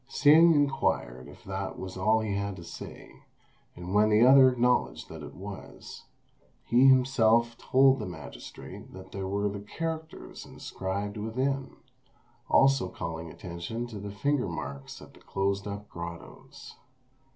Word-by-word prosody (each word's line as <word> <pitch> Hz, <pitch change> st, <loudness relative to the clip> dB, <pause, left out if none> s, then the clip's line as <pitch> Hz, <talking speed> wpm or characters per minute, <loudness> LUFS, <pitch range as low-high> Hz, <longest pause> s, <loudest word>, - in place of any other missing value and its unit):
Hsing 160 Hz, +3 st, +6 dB
inquired 100 Hz, -, 0 dB
if -, -, -14 dB
that 95 Hz, 0 st, -5 dB
was 95 Hz, 0 st, -7 dB
all 110 Hz, +4 st, +2 dB
he 105 Hz, -2 st, -2 dB
had 100 Hz, 0 st, -2 dB
to 85 Hz, -, -10 dB
say, -, -, -10 dB, 0.5 s
and 90 Hz, +2 st, -7 dB
when 105 Hz, +1 st, +4 dB
the 110 Hz, +2 st, +5 dB
other 130 Hz, 0 st, +8 dB
acknowledged 125 Hz, 0 st, 0 dB
that -, -, -9 dB
it -, -, -10 dB
was, -, -, -10 dB, 0.6 s
he 125 Hz, +3 st, +5 dB
himself 120 Hz, -3 st, +4 dB
told 135 Hz, +2 st, +4 dB
the 105 Hz, -, -4 dB
magistrate 80 Hz, -5 st, -10 dB
what 95 Hz, 0 st, -12 dB
were 100 Hz, +1 st, -1 dB
the 100 Hz, 0 st, -4 dB
characters 160 Hz, +9 st, -6 dB
inscribed 100 Hz, +2 st, -5 dB
within, 130 Hz, +5 st, -2 dB, 0.7 s
also 135 Hz, -8 st, +4 dB
calling 80 Hz, -1 st, -6 dB
attention 85 Hz, +9 st, -6 dB
to 110 Hz, -4 st, -8 dB
the 100 Hz, +1 st, -6 dB
finger 125 Hz, +5 st, 0 dB
marks 70 Hz, -5 st, -7 dB
at -, -, -15 dB
the -, -, -18 dB
closed 100 Hz, +1 st, -2 dB
up 100 Hz, +1 st, -6 dB
grottoes. 85 Hz, -1 st, -10 dB
105 Hz, 140 wpm, -28 LUFS, 95-130 Hz, 0.7 s, other